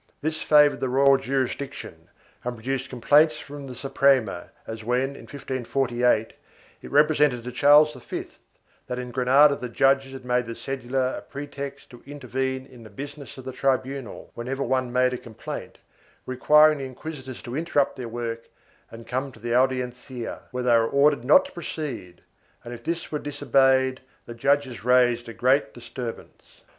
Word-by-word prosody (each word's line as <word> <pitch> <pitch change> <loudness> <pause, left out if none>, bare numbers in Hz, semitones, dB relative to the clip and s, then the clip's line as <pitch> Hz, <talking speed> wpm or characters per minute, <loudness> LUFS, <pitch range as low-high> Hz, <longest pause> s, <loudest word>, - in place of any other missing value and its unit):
This 155 +1 -3
favored 150 -1 +5
the 130 - -1
royal 135 +1 +5
jurisdiction 135 -9 -4 0.3
and 125 0 -3
produced 130 +3 -3
complaints 150 +5 +4
from 145 -1 -9
the 125 - -8
Suprema 135 -9 +1 0.2
as 110 0 -7
when, 125 +4 0
in - - -12
1548, 125 -4 0 0.5
it - - -10
represented 150 -4 +3
to 125 - -6
Charles 145 +4 +6
V 125 -3 -6 0.6
that 125 - -4
in 125 -1 -5
Granada 135 +4 +5
the 125 -2 -6
judges 135 +1 +1
made 125 -1 0
the 115 - -5
cedula 130 +1 -2
a - - -13
pretext 140 -1 -8
to 120 - -13
intervene 130 -1 -3
in 130 -3 -15
the 110 - -12
business 140 +6 -9
of 130 - -10
the 130 - -4
tribunal, 130 -1 -2
whenever 130 +4 -3
any - - -5
one 130 -2 +1
made 125 0 +2
a 125 - -4
complaint, 110 -3 -8 0.5
requiring 150 +4 +5
the 135 - -4
inquisitors 130 -1 -8
to 120 - -6
interrupt 150 -3 +1
their 125 -3 -6
work 115 0 -5 0.4
and 115 0 -11
come 130 +3 -3
to 115 - -17
the 120 +1 -3
Audiencia, 125 -1 -1
when 125 -1 -4
they 120 - +4
were 115 -1 +4
ordered 140 -2 +3
not 215 - +6
to 280 - -10
proceed 145 - -6 0.4
and, 120 - -8
if 115 -1 -10
this 170 +4 -3
was 150 - -2
disobeyed, 135 -2 +2 0.2
the 120 - -8
judges 135 0 0
raised 120 -1 +3
a - - -7
great 130 +3 +2
disturbance. 120 -1 -9
130 Hz, 165 wpm, -25 LUFS, 120-140 Hz, 0.6 s, Charles